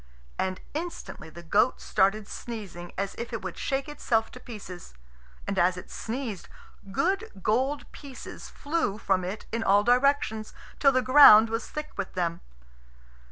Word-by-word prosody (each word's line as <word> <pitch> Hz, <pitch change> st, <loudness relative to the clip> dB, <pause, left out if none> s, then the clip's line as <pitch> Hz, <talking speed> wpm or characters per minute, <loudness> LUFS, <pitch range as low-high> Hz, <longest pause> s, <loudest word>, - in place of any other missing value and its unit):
And 185 Hz, 0 st, -1 dB
instantly 330 Hz, -, -6 dB
the 170 Hz, +2 st, -11 dB
goat 205 Hz, +9 st, +2 dB
started 200 Hz, +1 st, +1 dB
sneezing 195 Hz, -7 st, -7 dB
as 200 Hz, 0 st, -2 dB
if 235 Hz, +1 st, -5 dB
it 230 Hz, -4 st, -4 dB
would 190 Hz, -2 st, -5 dB
shake 275 Hz, +1 st, -2 dB
itself 230 Hz, -6 st, 0 dB
to 250 Hz, -, -11 dB
pieces. 185 Hz, -, -10 dB, 0.5 s
And 200 Hz, -, -1 dB
as 180 Hz, +1 st, +3 dB
it 180 Hz, -, -10 dB
sneezed, 230 Hz, -5 st, -5 dB, 0.4 s
good 385 Hz, -, 0 dB
gold 265 Hz, +7 st, +1 dB
pieces 275 Hz, -3 st, -10 dB
flew 290 Hz, -9 st, -2 dB
from 190 Hz, -3 st, 0 dB
it 190 Hz, +4 st, -5 dB
in 230 Hz, -, -1 dB
all 200 Hz, 0 st, +4 dB
directions, 245 Hz, -3 st, +2 dB, 0.2 s
till 275 Hz, -, +6 dB
the 255 Hz, -1 st, +1 dB
ground 250 Hz, -5 st, +9 dB
was 225 Hz, 0 st, -3 dB
thick 300 Hz, 0 st, -6 dB
with 200 Hz, -1 st, -4 dB
them. 170 Hz, -2 st, -1 dB
220 Hz, 155 wpm, -27 LUFS, 195-270 Hz, 0.5 s, ground